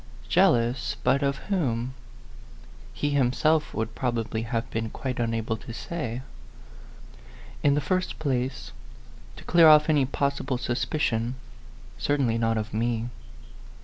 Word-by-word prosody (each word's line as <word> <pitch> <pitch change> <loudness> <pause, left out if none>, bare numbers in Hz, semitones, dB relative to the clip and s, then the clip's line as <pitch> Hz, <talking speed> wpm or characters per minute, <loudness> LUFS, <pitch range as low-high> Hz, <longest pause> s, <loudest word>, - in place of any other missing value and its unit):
Jealous 120 +2 +2
but 135 +3 +3
of 140 -1 0
whom? 130 - 0 1.0
He 145 - -2
himself 145 +3 +2
would 110 +1 -3
probably 115 -3 -2
have 115 0 -2
been 115 0 -2
quite 130 +2 -4
unable 115 -1 -1
to 115 - -9
say. 130 -7 -4 1.4
In 140 -1 +4
the 150 - +1
first 185 +5 -1
place 130 - -2 0.6
to - - -12
clear 170 -1 +6
off 150 0 +7
any 145 -3 +3
possible 140 -1 -1
suspicion 120 -1 -1 0.6
certainly 125 - +1
not 115 -1 +1
of 110 -1 -4
me. 115 +1 -1
125 Hz, 120 wpm, -26 LUFS, 115-145 Hz, 1.4 s, off